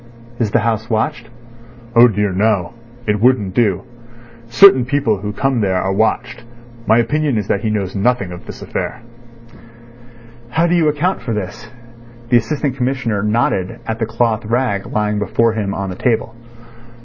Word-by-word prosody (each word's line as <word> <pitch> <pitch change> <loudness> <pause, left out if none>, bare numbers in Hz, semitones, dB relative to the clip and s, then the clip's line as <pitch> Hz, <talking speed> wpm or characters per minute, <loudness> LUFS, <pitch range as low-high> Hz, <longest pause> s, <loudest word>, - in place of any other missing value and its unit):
"Is 115 -3 +1
the 105 - +2
house 110 0 -1
watched?" 115 +1 -2 0.7
"Oh 120 +1 +8
dear, 105 -2 0
no. 100 +1 0 0.3
It 105 -1 0
wouldn't 115 -6 +2
do. 105 -5 +1 0.6
Certain 130 +2 +7
people 125 -4 0
who 105 +2 -5
come 130 +2 0
there 95 -2 +1
are 95 +1 -1
watched. 115 +3 -1 0.4
My 110 - +5
opinion 145 +2 +1
is 105 -2 -2
that - - +1
he 110 - -1
knows 100 -3 -2
nothing 105 -2 0
of 90 - -10
this - - -9
affair." 120 - -5 1.5
"How 160 +7 +1
do 175 - +1
you 170 -3 +3
account 150 +6 0
for 115 -1 -3
this?" 95 -4 -6 0.6
The 120 - +5
Assistant 140 +2 -2
Commissioner 125 -5 -1
nodded 105 -4 0
at 110 0 -3
the 110 - -1
cloth 115 -1 0
rag 115 -3 -1
lying 105 -1 -1
before 110 +3 +1
him 105 -3 -2
on 95 -1 -3
the - - -6
table. 115 +2 -1
110 Hz, 165 wpm, -17 LUFS, 105-125 Hz, 1.5 s, Oh